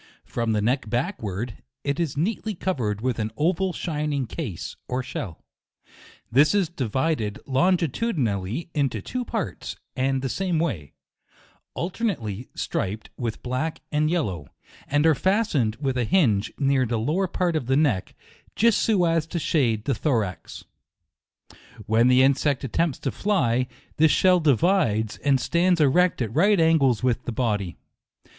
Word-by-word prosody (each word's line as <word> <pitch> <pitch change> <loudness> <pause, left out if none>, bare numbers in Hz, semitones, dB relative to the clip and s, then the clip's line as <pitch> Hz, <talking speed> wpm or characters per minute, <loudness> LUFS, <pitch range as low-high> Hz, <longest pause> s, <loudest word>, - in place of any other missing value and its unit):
From 115 -1 -1
the 105 -1 0
neck 125 0 0
backward, 120 - -3 0.3
it 140 +2 -1
is 160 -5 -1
neatly 215 +5 -1
covered 120 - -2
with 125 -2 -1
an 110 0 -2
oval 185 +4 +1
shining 150 -5 -2
case 115 - -6
or 125 +1 -2
shell; 110 -9 -6 0.9
this 145 - +5
is 195 -5 +2
divided 130 -5 -1
longitudinally 145 - 0
into 135 -7 0
two 250 - -4
parts, 225 -4 -4 0.2
and 135 0 0
the - - 0
same 180 +5 -1
way, 110 - -2 0.8
alternately 155 - -3
striped 105 +4 -3
with 115 -3 -4
black 130 +6 -2
and 150 0 +2
yellow, 95 - -1 0.4
and 145 +2 +2
are 160 - +6
fastened 160 - +1
with 135 -3 -1
a - - +2
hinge, 110 - +2
near 135 -3 +2
the 115 0 -1
lower 155 - 0
part 175 -1 -1
of 130 -6 -2
the 135 +1 +3
neck, 140 -11 +1 0.4
just 230 -1 +4
so 200 -6 +3
as 165 -1 +1
to 170 - -4
shade 120 -10 +1
the 140 - +1
thorax. 110 - -2 1.2
When 115 +2 +3
the 125 +1 +5
insect 140 0 +2
attempts 145 +3 0
to 135 - -1
fly, 130 - +1 0.3
this 160 +1 +5
shell 185 -1 +4
divides, 145 - +2
and 135 +1 +2
stands 175 +5 +2
erect 155 +1 +3
at 110 -1 -5
right 195 +5 +4
angles 140 -8 +3
with 125 -1 0
the - - -2
body. 105 -6 -1
135 Hz, 150 wpm, -24 LUFS, 115-170 Hz, 1.2 s, are